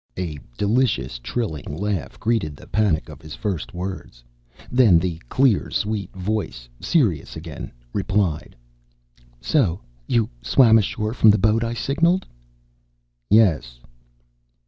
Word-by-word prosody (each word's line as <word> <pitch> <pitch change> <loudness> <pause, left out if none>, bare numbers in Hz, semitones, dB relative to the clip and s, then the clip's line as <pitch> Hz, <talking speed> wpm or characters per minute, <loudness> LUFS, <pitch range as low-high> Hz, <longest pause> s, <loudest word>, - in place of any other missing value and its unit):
A 85 -5 -4 0.2
delicious, 100 - +1
trilling 75 - -4
laugh 100 -2 -3
greeted 110 -10 0
the - - -14
panic 105 -7 +1
of 75 - -11
his 80 -2 -9
first 100 -2 -3
words. 90 -9 -6 0.5
Then 120 -9 +6
the 85 -1 -2
clear, 130 -6 +2
sweet 105 -3 -2
voice, 95 - -3
serious 110 - +1
again, 80 -2 -8 0.2
replied, 95 -5 -1 0.9
"So 95 - +1 0.3
you 115 -3 +2
swam 110 - +5
ashore 105 +1 -2
from 110 -2 +5
the 105 - +6
boat 110 +3 +2
I 115 0 -2
signaled?" 170 +9 +1 1.0
"Yes." 80 - +3
100 Hz, 120 wpm, -22 LUFS, 80-115 Hz, 1.0 s, Then